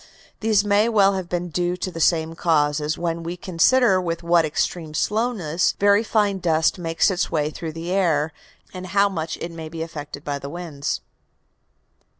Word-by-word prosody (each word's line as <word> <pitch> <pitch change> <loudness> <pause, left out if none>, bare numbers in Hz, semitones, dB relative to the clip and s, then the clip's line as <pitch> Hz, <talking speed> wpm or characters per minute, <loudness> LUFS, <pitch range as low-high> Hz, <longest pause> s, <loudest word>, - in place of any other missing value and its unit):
These 215 -2 +2
may 205 +2 +3
well 200 -3 +4
have 185 -2 -4
been 175 0 -2
due 175 +2 -1
to 185 - -4
the 165 - -7
same 160 0 +2
cause, 150 -3 +1 0.2
when 170 -1 -2
we 170 +2 -5
consider 190 +4 +3
with 170 -1 -3
what 170 -1 +4
extreme 155 +1 -2
slowness 210 -6 0
very 205 +2 +4
fine 205 -3 +1
dust 165 0 +1
makes 165 +4 +1
its 185 0 -1
way 150 -1 0
through 160 0 -6
the 165 +2 -5
air, 160 -5 +1 0.4
and 185 0 -7
how 200 +3 +3
much 160 -4 -4
it 170 - -6
may 160 -1 -7
be 165 0 -5
affected 145 -3 -8
by 145 -1 -2
the 140 - -7
winds. 160 -4 -4
170 Hz, 175 wpm, -22 LUFS, 160-195 Hz, 0.4 s, well